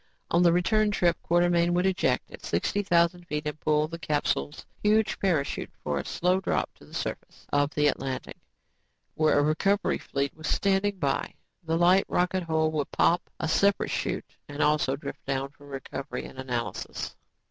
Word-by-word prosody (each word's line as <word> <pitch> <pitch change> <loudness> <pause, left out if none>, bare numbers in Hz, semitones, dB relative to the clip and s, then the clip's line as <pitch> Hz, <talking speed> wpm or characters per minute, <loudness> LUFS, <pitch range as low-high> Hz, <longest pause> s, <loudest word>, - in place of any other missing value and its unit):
On 170 - +4
the 175 -1 +6
return 210 +5 +3
trip, 175 -4 +2
Quartermain 175 0 +3
would 180 +1 +2
eject 180 -10 +1
at - - -11
sixty 185 - 0
thousand 175 -2 +2
feet 150 +1 -3
and 150 0 -4
pull 150 0 +2
the 165 +1 -7
capsule's 150 -1 -1 0.2
huge 215 +1 +2
parachute 165 -8 0
for 75 -1 -1
a - - -5
slow 180 +2 +1
drop 185 - -1
to - - -15
the - - -18
surface - - -5
of 145 0 +2
the 150 - +2
Atlantic 135 -2 -2 0.8
where 155 -2 +3
a 145 - +4
recovery 195 +7 +1
fleet 140 0 -2
was 155 -1 -7
standing 200 +2 +1
by. 140 -6 -1 0.3
The 165 0 -1
light 180 +3 +5
rocket 180 +1 +1
hull 160 -2 +1
would 150 -2 -2
pop 175 +1 +2
a - - -1
separate 200 +5 +2
chute - - -3
and 145 +1 -1
also 150 -3 +2
drift 140 0 -8
down 135 0 -1
for 145 0 -18
recovery 135 0 -6
and 130 - -11
analysis. 125 -3 -4
160 Hz, 175 wpm, -27 LUFS, 145-180 Hz, 0.8 s, the